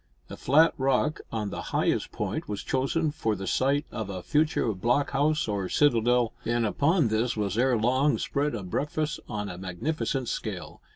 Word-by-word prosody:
A - - -5
flat 155 +5 +4
rock 135 +4 +1
on 105 -3 -3
the - - -4
highest - - 0
point - - -3
was 105 -1 -4
chosen 145 +4 0
for 110 -7 -1
the 95 0 -6
site 140 +7 +1
of 110 -4 -4
a 95 -2 -5
future 150 -7 +1
block 120 +9 +1
house 150 +1 +1
or 100 -3 -2
citadel, 120 -4 +3
and 120 0 0
upon 145 - +2
this 110 +2 0
was 100 -2 -1
ere 125 +1 +3
long 130 +6 +2
spread 145 -2 -1
a 105 - -5
breakfast 150 - -2
on 105 -2 -3
a 90 -2 -7
magnificent 125 - -2
scale. 95 -8 -5
125 Hz, 175 wpm, -27 LUFS, 105-145 Hz, -, flat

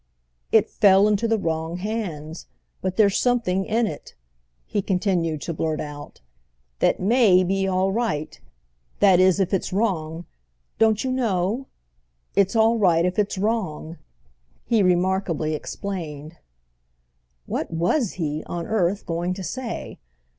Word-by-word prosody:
"It 220 -1 +4
fell 200 -1 +5
into 210 +2 +1
the 225 0 +2
wrong 165 -2 -2
hands. 180 -7 -5 0.3
But 185 0 -3
there's 200 -2 +4
something 225 -7 +1
in 230 +2 +1
it," 155 -9 -7 0.5
he 205 - -1
continued 180 -5 0
to 170 - -4
blurt 155 0 -2
out, 145 - -8 0.6
"that - - +2
may 200 -3 +4
be 195 +1 0
all 190 0 +1
right. 195 -9 -2 0.6
That 190 -3 +5
is, 185 +1 +4
if 190 -1 0
it's 195 - -1
wrong, 175 -5 -1 0.5
don't 220 -1 +3
you 260 - -1
know? 230 0 -1 0.7
It's 195 +2 +2
all 225 +1 +4
right 170 -4 +3
if 180 +3 -1
it's 205 -1 0
wrong," 185 -6 -2 0.7
he 230 -3 +2
remarkably 180 -3 +1
explained. 155 -2 -6 1.1
What - - -3
was 180 - 0
he, 155 -3 -3
on 170 -1 -4
earth, 200 -2 0
going 175 +2 -2
to 190 - -6
say? 250 +4 -5
190 Hz, 135 wpm, -23 LUFS, 170-215 Hz, 1.1 s, fell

